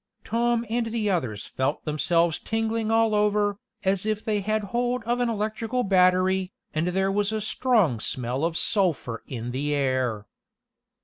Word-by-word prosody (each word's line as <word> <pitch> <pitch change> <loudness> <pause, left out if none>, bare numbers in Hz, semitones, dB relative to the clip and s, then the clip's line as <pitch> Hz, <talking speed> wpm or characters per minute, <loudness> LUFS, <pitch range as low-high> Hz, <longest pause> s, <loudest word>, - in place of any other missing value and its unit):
Tom 235 +1 +1
and 230 +1 -1
the 220 -2 0
others 125 - -2
felt 135 +3 -2
themselves 165 +2 +1
tingling 225 0 -1
all 225 -1 +3
over, 210 -1 +2 0.2
as 190 -1 +1
if 215 0 -2
they 210 -2 0
had 215 +2 0
hold 245 0 0
of 240 +2 0
an 245 -1 +1
electrical 220 +3 -1
battery, 185 -1 +3 0.2
and 155 +3 0
there 190 +2 +1
was 205 +1 +1
a 220 - -1
strong 215 - +2
smell 125 +4 -2
of 165 0 0
sulphur 155 - 0
in 120 -1 -5
the 145 +3 -1
air. 130 -6 0
200 Hz, 160 wpm, -25 LUFS, 155-225 Hz, 0.2 s, all